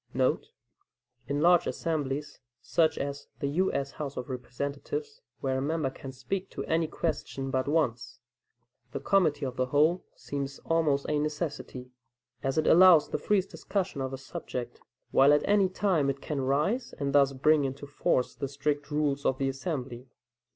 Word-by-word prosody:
* -, -, -34 dB, 1.1 s
[In 145 Hz, +2 st, -1 dB
large 175 Hz, +1 st, +5 dB
assemblies, 145 Hz, -3 st, -2 dB, 0.2 s
such 160 Hz, +5 st, +1 dB
as 140 Hz, 0 st, -4 dB
the 145 Hz, -, -2 dB
U. 180 Hz, +7 st, +1 dB
S. 140 Hz, 0 st, -2 dB
House 145 Hz, -3 st, -6 dB
of 125 Hz, +1 st, -4 dB
Representatives, 140 Hz, -, -5 dB, 0.2 s
where 130 Hz, -1 st, 0 dB
a -, -, -2 dB
member 150 Hz, -1 st, -1 dB
can 135 Hz, 0 st, -9 dB
speak 180 Hz, +9 st, -4 dB
to -, -, -5 dB
any 160 Hz, 0 st, +1 dB
question 140 Hz, -4 st, -3 dB
but 130 Hz, 0 st, 0 dB
once, 145 Hz, -7 st, 0 dB, 0.8 s
the -, -, -2 dB
committee 155 Hz, -7 st, +2 dB
of 130 Hz, -1 st, -5 dB
the 130 Hz, 0 st, +1 dB
whole 155 Hz, +7 st, +3 dB
seems 140 Hz, -1 st, -5 dB
almost 155 Hz, -4 st, +2 dB
a 150 Hz, -1 st, +1 dB
necessity, 145 Hz, -4 st, -4 dB, 0.5 s
as 135 Hz, +2 st, -1 dB
it 155 Hz, -, +2 dB
allows 175 Hz, -3 st, +7 dB
the -, -, -2 dB
freest 200 Hz, -2 st, +1 dB
discussion 190 Hz, -7 st, -3 dB
of 130 Hz, 0 st, -2 dB
a 135 Hz, -, -4 dB
subject, 125 Hz, -2 st, -6 dB, 0.3 s
while 135 Hz, +2 st, +6 dB
at 145 Hz, -, +2 dB
any 200 Hz, -2 st, +4 dB
time 180 Hz, -7 st, +1 dB
it 140 Hz, 0 st, -2 dB
can 140 Hz, 0 st, -3 dB
rise 150 Hz, -, 0 dB
and 140 Hz, -1 st, -2 dB
thus 140 Hz, -1 st, +5 dB
bring 150 Hz, +3 st, +3 dB
into 135 Hz, +1 st, -4 dB
force 140 Hz, -3 st, 0 dB
the 140 Hz, -, -4 dB
strict 145 Hz, +2 st, -2 dB
rules 145 Hz, -2 st, 0 dB
of 130 Hz, -, +1 dB
the 135 Hz, 0 st, 0 dB
assembly. 135 Hz, -3 st, -4 dB
145 Hz, 170 wpm, -29 LUFS, 135-160 Hz, 1.1 s, allows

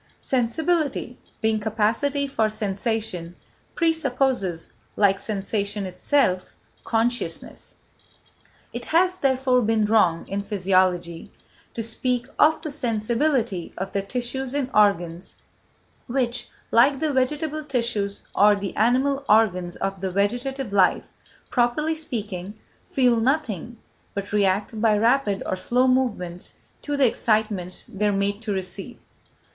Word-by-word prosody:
Sensibility, 270 Hz, +1 st, -1 dB, 0.2 s
being 220 Hz, -1 st, +2 dB
capacity 225 Hz, +7 st, 0 dB
for 225 Hz, -6 st, 0 dB
sensation, 210 Hz, -4 st, -3 dB, 0.4 s
presupposes, 265 Hz, -, 0 dB, 0.2 s
like 195 Hz, -2 st, +3 dB
sensation 200 Hz, 0 st, -3 dB
itself, 185 Hz, -1 st, 0 dB, 0.3 s
consciousness. 240 Hz, +2 st, -2 dB, 1.0 s
It -, -, -5 dB
has, 365 Hz, +2 st, +2 dB
therefore, 260 Hz, -2 st, +2 dB
been 220 Hz, -1 st, +2 dB
wrong, 205 Hz, -6 st, +2 dB
in 200 Hz, +1 st, -2 dB
physiology, 185 Hz, -4 st, 0 dB, 0.4 s
to 230 Hz, -, -2 dB
speak 245 Hz, +2 st, +1 dB
of 315 Hz, +1 st, +4 dB
the 310 Hz, -, -4 dB
sensibility 235 Hz, -, -1 dB
of 195 Hz, +1 st, -4 dB
the 200 Hz, -, -1 dB
tissues 250 Hz, +5 st, -3 dB
and 270 Hz, -2 st, -1 dB
organs, 180 Hz, -4 st, +1 dB, 0.7 s
which, 245 Hz, -1 st, -1 dB, 0.2 s
like 265 Hz, +4 st, +4 dB
the 310 Hz, -1 st, 0 dB
vegetable 300 Hz, +4 st, -1 dB
tissues 230 Hz, -7 st, -2 dB
or 205 Hz, +1 st, +5 dB
the 200 Hz, -1 st, -5 dB
animal 265 Hz, +5 st, +2 dB
organs 185 Hz, -5 st, +3 dB
of 195 Hz, 0 st, -3 dB
vegetative 210 Hz, +6 st, -1 dB
life, 190 Hz, -2 st, +3 dB, 0.5 s
properly 250 Hz, +6 st, +1 dB
speaking, 210 Hz, -, -4 dB, 0.3 s
feel 250 Hz, -3 st, +3 dB
nothing, 240 Hz, -, -1 dB, 0.4 s
but 200 Hz, +1 st, -5 dB
react 205 Hz, +2 st, +1 dB
by 220 Hz, -2 st, +4 dB
rapid 225 Hz, -2 st, +2 dB
or -, -, -1 dB
slow 245 Hz, +7 st, +1 dB
movements 210 Hz, -9 st, -1 dB, 0.3 s
to 290 Hz, -1 st, -3 dB
the 275 Hz, -, +4 dB
excitements 215 Hz, -6 st, 0 dB
they 210 Hz, +2 st, -2 dB
are -, -, +2 dB
made 200 Hz, +1 st, -1 dB
to 220 Hz, -2 st, -3 dB
receive. 195 Hz, +4 st, -4 dB
225 Hz, 120 wpm, -24 LUFS, 200-260 Hz, 1.0 s, or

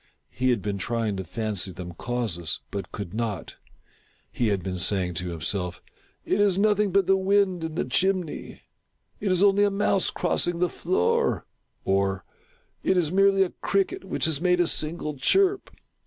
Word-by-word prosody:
He 130 Hz, 0 st, 0 dB
had 120 Hz, -6 st, +1 dB
been 100 Hz, -1 st, -2 dB
trying 115 Hz, 0 st, -1 dB
to 95 Hz, -, -3 dB
fancy 100 Hz, 0 st, -2 dB
them 90 Hz, 0 st, -8 dB
causeless, 95 Hz, -, -2 dB
but 100 Hz, -2 st, -5 dB
could 100 Hz, -3 st, -6 dB
not. 110 Hz, -5 st, -4 dB, 0.7 s
He 120 Hz, -, 0 dB
had 100 Hz, -4 st, 0 dB
been 90 Hz, 0 st, -3 dB
saying 95 Hz, -1 st, 0 dB
to 90 Hz, -, -4 dB
himself 90 Hz, +2 st, -2 dB, 0.2 s
— -, -, -33 dB
" -, -, -42 dB
It 205 Hz, -, +1 dB
is 200 Hz, -3 st, +3 dB
nothing 210 Hz, 0 st, +3 dB
but 195 Hz, 0 st, +3 dB
the 195 Hz, +2 st, +4 dB
wind 190 Hz, -2 st, +2 dB
in 160 Hz, -1 st, -4 dB
the -, -, -1 dB
chimney 185 Hz, -4 st, -1 dB, 0.3 s
— -, -, -44 dB
it 200 Hz, -2 st, 0 dB
is 185 Hz, +1 st, +3 dB
only 200 Hz, 0 st, +5 dB
a 205 Hz, -, +4 dB
mouse 195 Hz, -1 st, +1 dB
crossing 175 Hz, -1 st, 0 dB
the 180 Hz, 0 st, +1 dB
floor," 165 Hz, -, 0 dB, 0.4 s
or 95 Hz, 0 st, 0 dB, 0.3 s
" -, -, -40 dB
it 190 Hz, -, +2 dB
is 165 Hz, -4 st, +1 dB
merely 195 Hz, 0 st, +4 dB
a 180 Hz, -, -3 dB
cricket 195 Hz, -1 st, 0 dB
which 190 Hz, -, -2 dB
has 155 Hz, -2 st, +1 dB
made 180 Hz, 0 st, +3 dB
a 175 Hz, -, +4 dB
single 155 Hz, -2 st, -2 dB
chirp." 385 Hz, -, +2 dB
150 Hz, 185 wpm, -26 LUFS, -, 0.7 s, only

